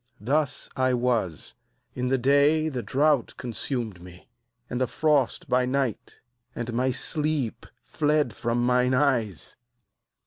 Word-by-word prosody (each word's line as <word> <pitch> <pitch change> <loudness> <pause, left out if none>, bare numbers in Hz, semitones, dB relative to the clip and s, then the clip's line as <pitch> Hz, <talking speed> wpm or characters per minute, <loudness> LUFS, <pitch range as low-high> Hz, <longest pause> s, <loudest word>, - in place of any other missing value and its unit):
40Thus 140 +5 -1
I 130 -1 +2
was: 120 -9 -1 0.4
in 125 0 -2
the 135 +1 +2
day 145 +4 +3
the 130 -5 -3
drought 140 +4 +1
consumed 115 -5 -4
me, 90 0 -14 0.4
and 125 +1 -3
the 130 - +2
frost 150 -2 +1
by 125 0 +2
night; 130 -4 -2 0.3
and 120 0 -4
my 125 +3 +1
sleep 150 -1 -2 0.2
fled 150 -2 0
from 120 +1 -1
mine 125 +1 +3
eyes. 120 - 0
125 Hz, 130 wpm, -26 LUFS, 120-140 Hz, 0.4 s, day